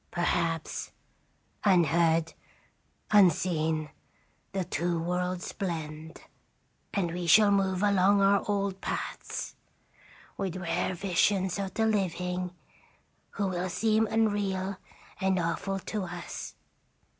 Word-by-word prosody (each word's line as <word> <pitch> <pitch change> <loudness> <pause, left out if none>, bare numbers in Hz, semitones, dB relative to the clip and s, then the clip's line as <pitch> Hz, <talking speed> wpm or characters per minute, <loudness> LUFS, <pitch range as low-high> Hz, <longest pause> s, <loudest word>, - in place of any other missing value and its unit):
Perhaps, 165 -2 -1 0.7
unheard, 165 -3 +3 0.8
unseen, 160 -5 +3 0.6
the 190 -2 -2
two 170 0 -1
worlds 180 +1 -2
blend, 160 -4 -5 0.7
and 180 -4 0
we 175 0 -4
shall 210 +4 +7
move 190 -1 +1
along 200 0 +4
our 200 0 +4
old 200 -1 -1
paths, - - -4 0.8
with 190 -3 -2
rare 180 0 -1
visions 190 +1 +1
of 195 -1 -4
the 225 - +2
living, 180 -3 -1 0.8
who 205 - -1
will 180 0 -2
seem 220 +4 +2
unreal 200 -3 0 0.4
and 190 -1 +2
awful 175 +3 -1
to 195 +1 -4
us. 175 0 -7
185 Hz, 100 wpm, -29 LUFS, 170-200 Hz, 0.8 s, shall